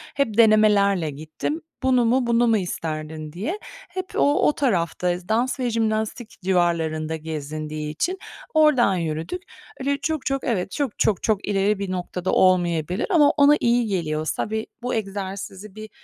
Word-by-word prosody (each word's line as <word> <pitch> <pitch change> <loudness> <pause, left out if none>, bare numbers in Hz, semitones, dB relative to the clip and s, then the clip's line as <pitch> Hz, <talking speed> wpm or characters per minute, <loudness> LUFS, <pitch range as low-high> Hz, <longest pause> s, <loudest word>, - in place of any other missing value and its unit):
hep 235 -6 0
denemelerle 210 -6 +4
gittim. 155 - -5 0.2
Bunu 255 -2 +3
mu, 245 +1 +2
bunu 235 0 +3
mu 225 -1 +4
isterdin, 155 -4 -5
diye. 275 - -3 0.3
Hep 370 +1 -4
o, 285 +1 +3
o 300 - +3
tarafta 180 - 0 0.2
dans 245 +5 +1
ve 250 -2 0
jimnastik 220 +1 -1
civarlarında 165 -4 0
gezindiği 155 -1 -5
için 360 - -2 0.4
oradan 300 -10 +4
yürüdük. 165 - -3 0.4
Öyle 280 +1 0
çok, 310 0 -3
çok 275 0 -1
evet, 195 -6 -1
çok, 275 0 -3
çok, 205 -5 +1
çok 215 -2 0
ileri 200 0 +1
bir 200 -2 -3
noktada 180 0 -3
olmayabilir 175 0 +2
ama 310 -7 +5
ona 285 0 +6
iyi 240 0 +2
geliyorsa 155 -3 -2
ve 220 0 -2 0.2
bu 245 +1 -2
egzersizi 195 -1 -5
bir, 215 0 -8
205 Hz, 150 wpm, -23 LUFS, 170-245 Hz, 0.4 s, ona